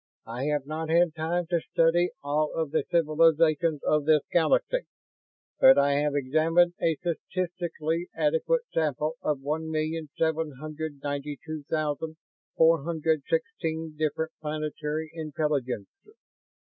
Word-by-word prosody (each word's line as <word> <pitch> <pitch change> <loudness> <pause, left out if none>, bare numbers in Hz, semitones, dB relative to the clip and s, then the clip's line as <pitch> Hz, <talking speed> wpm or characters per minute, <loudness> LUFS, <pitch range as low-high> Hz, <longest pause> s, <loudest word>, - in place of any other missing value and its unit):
I 120 +4 -4
have 150 -2 0
not 155 +2 -4
had 170 0 +4
time 170 +2 -1
to 170 - +3
study 170 +3 +2
all 150 +2 0
of 160 -3 -2
the 160 - +1
civilizations 160 -1 +3
of 150 -1 +2
this 155 -2 +4
Galaxy, 175 - +2 0.7
but 265 0 +8
I 140 0 +4
have 145 -1 0
examined 160 +6 +3
a 165 -1 +2
statistically 170 0 -3
adequate 160 - +1
sample 155 0 0
of 145 -3 -1
one 155 +3 -2
million 155 0 -2
seven 160 -2 0
hundred 155 -1 -6
ninety 145 0 -3
two 155 -1 -5
thousand 155 0 -2 0.4
four 165 -2 +5
hundred 160 -1 0
sixteen 165 - -2
different 155 +1 -1
planetary 155 0 -3
intelligences. 150 - -3
155 Hz, 130 wpm, -27 LUFS, 150-165 Hz, 0.7 s, but